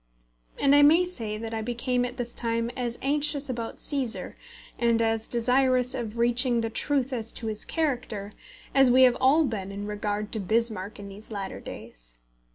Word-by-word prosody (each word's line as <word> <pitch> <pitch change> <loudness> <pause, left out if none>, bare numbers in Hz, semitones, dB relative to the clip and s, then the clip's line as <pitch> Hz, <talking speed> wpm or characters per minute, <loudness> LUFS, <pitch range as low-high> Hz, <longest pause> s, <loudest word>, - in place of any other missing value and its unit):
And 280 0 +3
I 290 - +7
may 325 +5 +6
say 225 -12 -4
that 225 +1 -6
I 220 - -2
became 245 +2 -1
at 245 +1 -7
this 240 -1 -4
time 230 0 -1
as 240 -2 -2
anxious 285 0 +2
about 235 -2 -5
Cæsar, 265 -5 0 0.5
and 235 -1 +2
as 225 -1 0
desirous 250 +1 +2
of 230 -2 -5
reaching 240 0 +3
the 225 0 -3
truth 275 +1 -1
as 230 -2 -4
to 230 - -5
his 215 -1 -2
character, 245 -10 -2 0.4
as 270 -2 +5
we 255 +1 +6
have 250 -1 +5
all 280 +5 +5
been 200 -6 -4
in 200 +1 -6
regard 210 0 -3
to 220 - -2
Bismarck 215 0 -1
in 200 -1 -9
these 200 +2 -12
latter 200 -3 -5
days. - - -10
235 Hz, 180 wpm, -26 LUFS, 215-260 Hz, 0.5 s, I